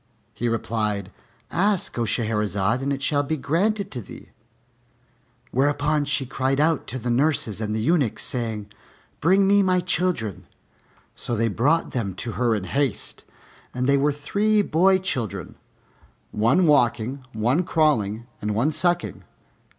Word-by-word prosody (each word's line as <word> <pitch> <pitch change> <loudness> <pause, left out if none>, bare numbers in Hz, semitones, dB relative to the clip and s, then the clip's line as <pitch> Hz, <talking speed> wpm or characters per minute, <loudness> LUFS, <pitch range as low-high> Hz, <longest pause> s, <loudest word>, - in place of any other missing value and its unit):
He 120 - -2
replied, 105 -4 -2 0.4
"Ask, 200 0 +1
O 115 - +1
Shahrazad, 105 0 0
and 140 +1 -1
it 135 0 -2
shall 145 0 +2
be 155 +2 -2
granted 195 +8 0
to 125 - -4
thee." - - -12 1.2
Whereupon 145 +2 +1
she 140 -1 0
cried 135 +2 -1
out 155 0 +2
to 130 - -4
the 125 -1 -2
nurses 120 -5 +1
and 105 0 -2
the 110 - -1
eunuchs, 140 -3 +1
saying, 110 -4 -4 0.5
"Bring 190 +4 +4
me 200 +1 +5
my 185 -1 +3
children." 175 - -1 0.7
So 120 - -3
they 115 +1 +1
brought 145 +11 +1
them 100 -7 -3
to 115 - -5
her 120 0 +1
in 100 - -3
haste, 135 +4 -2 0.5
and 125 0 -1
they 140 +1 +4
were 140 +2 +2
three 205 +9 +1
boy 190 +3 +4
children, 130 - -3 0.8
one 115 +12 +3
walking, 130 -2 +2
one 120 +10 +1
crawling, 120 - +1 0.2
and 105 0 -2
one 130 +8 +2
sucking. 175 +2 -1
135 Hz, 145 wpm, -24 LUFS, 110-160 Hz, 1.2 s, me